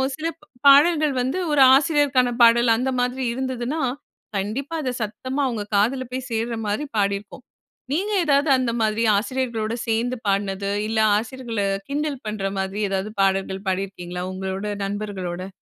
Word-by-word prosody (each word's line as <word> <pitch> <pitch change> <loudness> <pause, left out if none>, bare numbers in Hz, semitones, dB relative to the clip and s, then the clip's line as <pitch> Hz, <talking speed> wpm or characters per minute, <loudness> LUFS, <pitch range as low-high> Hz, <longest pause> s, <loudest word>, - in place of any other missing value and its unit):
சில 315 +3 -3
ப் 300 - -21 0.2
பாடல்கள் 300 +1 +6
வந்து 260 +8 -1
ஒரு 290 -2 +4
ஆசிரியருக்கான 275 -4 +2
பாடல் 235 0 +6
அந்த 260 +3 -1
மாதிரி 250 +1 -1
இருந்ததுனா, 260 +3 -3 0.6
கண்டிப்பா 255 +11 -3
அத 255 - -1
சத்தமா 255 +6 -3
அவங்க 230 -4 -3
காதுல 240 +6 +2
போய் 255 0 -4
சேர்ற 230 +1 -1
மாரி 210 +8 -1
பாடியிருக்கோம். 200 +4 -2 0.5
நீங்க 400 +7 -1
ஏதாவது 285 0 +3
அந்த 250 -2 0
மாதிரி 220 +1 +1
ஆசிரியர்களோடு 230 -1 -2
சேர்ந்து 235 +3 0
பாடுனது, 200 0 0 0.2
இல்ல 220 0 0 0.2
ஆசிரியர்கள 230 -1 -3 0.3
கிண்டல் 285 -2 -2
பண்ற 210 -2 -3
மாதிரி 190 +2 -3
ஏதாவது 195 +2 -2
பாடல்கள் 195 0 0
பாடியிருக்கீங்களா? 180 -2 -4
உங்களோட 190 +2 -4 0.2
நண்பர்களோட. 195 -3 -4
230 Hz, 140 wpm, -23 LUFS, 200-265 Hz, 0.6 s, பாடல்கள்